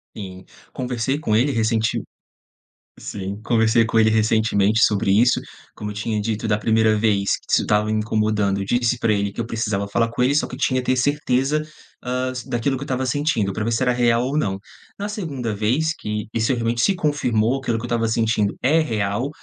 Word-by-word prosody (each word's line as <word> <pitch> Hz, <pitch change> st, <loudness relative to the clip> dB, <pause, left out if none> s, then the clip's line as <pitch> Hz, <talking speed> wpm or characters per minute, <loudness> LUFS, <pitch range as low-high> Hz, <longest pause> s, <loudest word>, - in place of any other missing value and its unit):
Sim, 95 Hz, -3 st, -8 dB, 0.3 s
conversei 125 Hz, +2 st, -2 dB
com 110 Hz, -8 st, 0 dB
ele, 130 Hz, +6 st, +3 dB
ressentiu 110 Hz, -2 st, 0 dB, 1.0 s
sim, 100 Hz, +1 st, -6 dB
conversei 115 Hz, 0 st, +3 dB
com 115 Hz, -, -1 dB
ele 110 Hz, -, +5 dB
recentemente 110 Hz, -1 st, +2 dB
sobre 100 Hz, -1 st, +2 dB
isso. 120 Hz, +5 st, +4 dB, 0.4 s
Como 105 Hz, -, -5 dB
eu -, -, -9 dB
tinha 105 Hz, +1 st, -2 dB
dito, 110 Hz, +1 st, -2 dB
da 105 Hz, -1 st, +2 dB
primeira 110 Hz, 0 st, +3 dB
vez 105 Hz, -2 st, +1 dB
que -, -, -23 dB
isso -, -, +3 dB
estava 105 Hz, +1 st, +1 dB
incomodando, 105 Hz, -2 st, 0 dB
disse 120 Hz, +4 st, +1 dB
pra 115 Hz, -, +1 dB
ele 100 Hz, -1 st, 0 dB
que -, -, -4 dB
eu -, -, -3 dB
precisava 105 Hz, -4 st, -2 dB
falar 115 Hz, +3 st, 0 dB
com 125 Hz, -, -3 dB
ele, 140 Hz, +3 st, +2 dB
só -, -, +2 dB
que -, -, -13 dB
eu -, -, -13 dB
tinha 130 Hz, -1 st, +1 dB
ter 130 Hz, -, +1 dB
certeza, 145 Hz, +2 st, +1 dB, 0.4 s
hã, 125 Hz, +1 st, -1 dB
s 125 Hz, -1 st, -7 dB
daquilo 125 Hz, +3 st, -1 dB
que 135 Hz, -, -6 dB
eu -, -, -8 dB
estava 130 Hz, -1 st, -2 dB
sentindo, 125 Hz, -7 st, 0 dB
pra 105 Hz, +3 st, -3 dB
ver 115 Hz, -, -1 dB
se 115 Hz, -, 0 dB
era 125 Hz, -, +3 dB
real 120 Hz, -1 st, +2 dB
ou 140 Hz, +4 st, -1 dB
não. 95 Hz, -9 st, -1 dB, 0.4 s
Na 205 Hz, +1 st, -4 dB
segunda 140 Hz, -, -4 dB
vez 130 Hz, +10 st, +1 dB
que 105 Hz, 0 st, -4 dB
isso 115 Hz, +3 st, +1 dB
realmente 115 Hz, -1 st, -1 dB
se 195 Hz, -, +3 dB
confirmou, 135 Hz, -7 st, 0 dB
que -, -, -14 dB
aquilo 115 Hz, -, 0 dB
que -, -, -8 dB
eu 120 Hz, -, -4 dB
estava 115 Hz, -1 st, 0 dB
sentindo 110 Hz, -2 st, +1 dB
é 150 Hz, +6 st, +3 dB
real, 110 Hz, -3 st, -1 dB
115 Hz, 210 wpm, -21 LUFS, 105-130 Hz, 1.0 s, ele